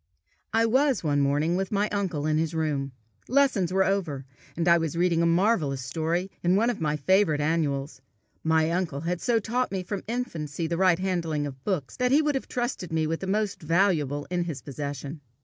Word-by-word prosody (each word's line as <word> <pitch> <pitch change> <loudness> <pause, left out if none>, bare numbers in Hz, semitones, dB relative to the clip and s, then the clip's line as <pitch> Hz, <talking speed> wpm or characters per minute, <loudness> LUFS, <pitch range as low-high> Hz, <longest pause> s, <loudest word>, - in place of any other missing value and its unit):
I 225 +1 +3
was 265 +2 +2
one 145 -2 +1
morning 145 +5 +1
with 190 0 -2
my 205 0 +1
uncle 180 -8 -2
in 155 0 +2
his 160 0 -1
room. 145 -4 -1 0.4
Lessons 250 -9 +2
were 190 +1 +3
over, 175 -9 -1 0.3
and 170 0 0
I 170 0 +6
was 165 0 -2
reading 170 -1 +2
a 170 - +3
marvellous 165 - +2
story 165 +7 -2
in 175 +1 +3
one 230 +4 +3
of 215 - -7
my 150 -1 0
favourite 160 +1 +3
annuals: 145 -3 -1 0.4
my 160 0 +2
uncle 170 -5 -1
had 175 +1 -2
so 240 -2 +2
taught 240 +4 -1
me 190 -2 -2
from 195 +1 -4
infancy 170 - -3
the 170 +1 -1
right 180 -1 +4
handling 170 -5 -1
of 135 -2 -8
books, 170 -10 -2
that 250 -1 +1
he 295 +3 +5
would 300 -1 +1
have 270 - -3
trusted 240 -8 -3
me 160 -1 +1
with 165 +1 -2
the 190 - -5
most 205 0 -1
valuable 155 -4 +1
in 175 -1 0
his 160 -5 -5
possession. 145 +1 -6
170 Hz, 200 wpm, -26 LUFS, 150-200 Hz, 0.4 s, I